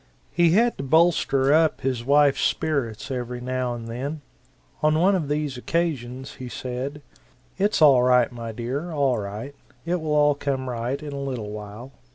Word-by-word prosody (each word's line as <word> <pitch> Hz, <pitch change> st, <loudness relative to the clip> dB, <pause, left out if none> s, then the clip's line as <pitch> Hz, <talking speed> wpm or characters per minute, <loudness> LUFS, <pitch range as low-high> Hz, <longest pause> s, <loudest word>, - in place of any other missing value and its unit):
He 170 Hz, -1 st, +3 dB
had 235 Hz, +4 st, +3 dB
to -, -, -3 dB
bolster 145 Hz, -2 st, +3 dB
up 160 Hz, 0 st, +3 dB
his 130 Hz, -3 st, -1 dB
wife's 140 Hz, +1 st, +4 dB
spirits 135 Hz, -5 st, -1 dB
every 125 Hz, -1 st, -4 dB
now 125 Hz, -1 st, -2 dB
and 115 Hz, -1 st, -8 dB
then. 140 Hz, +6 st, -5 dB, 0.6 s
On 155 Hz, 0 st, +3 dB
one 190 Hz, +4 st, +4 dB
of 175 Hz, -6 st, 0 dB
these 145 Hz, -2 st, -2 dB
occasions 135 Hz, -4 st, -2 dB
he 130 Hz, -1 st, -7 dB
said: 130 Hz, +4 st, -5 dB, 0.6 s
"It's 200 Hz, -4 st, +2 dB
all 135 Hz, -4 st, +7 dB
right, 125 Hz, 0 st, +4 dB
my 115 Hz, -2 st, -6 dB
dear, 125 Hz, +9 st, -4 dB
all 140 Hz, -6 st, +1 dB
right; 105 Hz, +7 st, -6 dB, 0.3 s
it 175 Hz, 0 st, -1 dB
will 155 Hz, -1 st, -1 dB
all 145 Hz, 0 st, +4 dB
come 135 Hz, -2 st, -3 dB
right 120 Hz, +3 st, -3 dB
in 145 Hz, -1 st, -6 dB
a 140 Hz, -, -4 dB
little 125 Hz, -6 st, -4 dB
while. 105 Hz, +4 st, -8 dB
135 Hz, 175 wpm, -24 LUFS, 125-150 Hz, 0.6 s, all